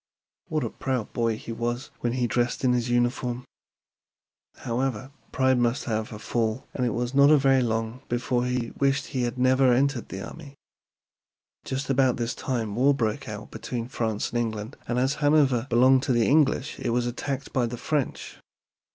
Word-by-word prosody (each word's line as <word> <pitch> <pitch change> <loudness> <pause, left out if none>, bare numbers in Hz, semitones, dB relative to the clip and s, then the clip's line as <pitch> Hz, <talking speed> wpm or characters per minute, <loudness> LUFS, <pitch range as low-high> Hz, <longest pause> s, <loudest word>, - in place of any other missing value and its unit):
What 155 -2 -1
a - - -3
proud 130 -5 -3
boy 115 -2 0
he 115 - -8
was 120 +3 -3
when 120 -1 -1
he 125 -1 0
dressed 120 +2 0
in 125 -1 +4
his 120 -1 0
new 120 - +2
uniform! 120 0 0 1.1
However, 130 +1 -3 0.2
pride 130 -1 +2
must 120 +1 +1
have 110 -2 -2
a 105 - -6
fall, 110 +2 -2
and 125 - -2
it 115 - -1
was 120 +2 -2
not 140 +1 +6
very 135 -1 +4
long 115 +1 -2
before 120 0 0
he 125 -2 -2
wished 135 0 +2
he 130 - -3
had 120 0 -2
never 130 +1 +4
entered 130 -1 +1
the 95 - -6
army. 145 -4 -11 1.1
Just 135 +1 -3
about 130 -2 +3
this 120 -1 -2
time 115 -5 -3
war 135 +4 +4
broke 115 +1 -2
out 105 0 -7
between 120 -2 -4
France 110 -4 -2
and 120 - 0
England, 110 +1 -3
and 120 - -1
as 130 +2 +2
Hanover 140 -5 +3
belonged 130 +2 +5
to 135 -1 0
the 120 -2 +3
English 145 -2 +2
it - - -2
was 120 +1 +1
attacked 135 +3 -4
by 125 -2 +2
the 120 +1 -5
French. 145 +1 -3
125 Hz, 185 wpm, -26 LUFS, 115-135 Hz, 1.1 s, not